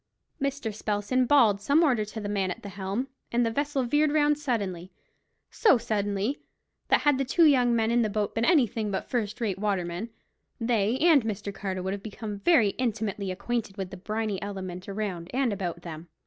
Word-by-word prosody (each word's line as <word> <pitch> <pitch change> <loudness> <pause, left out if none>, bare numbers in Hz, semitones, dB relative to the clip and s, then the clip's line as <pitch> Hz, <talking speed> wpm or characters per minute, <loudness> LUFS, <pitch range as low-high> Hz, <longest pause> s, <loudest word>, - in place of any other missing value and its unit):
Mr. 275 -5 -2
Spelsand 215 +5 0
bawled 225 -8 +5
some 285 +10 +3
order 250 -8 +3
to 215 +2 -7
the 205 - -4
man 200 -2 0
at 180 - -6
the 200 - -6
helm, 200 +6 -3 0.2
and 240 0 +2
the 230 - 0
vessel 285 +1 -1
veered 295 +5 +2
round 295 -1 +3
suddenly; 195 - -2 0.6
so 420 - +4
suddenly, 205 +3 -1 0.5
that - - +4
had 290 -3 +3
the - - +2
two 325 +6 +4
young 250 -5 +4
men 225 0 +1
in 240 0 +3
the 220 - +1
boat 205 0 -1
been 225 - -1
anything 235 - +2
but 190 -1 -3
first 215 -4 -1
rate 200 -5 -2
watermen, 195 0 -2 0.5
they 230 -1 +1
and 310 -4 +5
Mr. 205 -2 -4
Carter 190 -2 -4
would 190 +1 -2
have 200 - -5
become 210 -1 -6
very 230 - +4
intimately 215 -5 -2
acquainted 205 +2 -3
with 190 -2 -4
the - - -6
briny 210 +1 -3
element 190 -2 -6
around 195 -4 -4
and 260 -5 +1
about 185 -3 -4
them. 165 0 -8
215 Hz, 190 wpm, -27 LUFS, 195-250 Hz, 0.6 s, bawled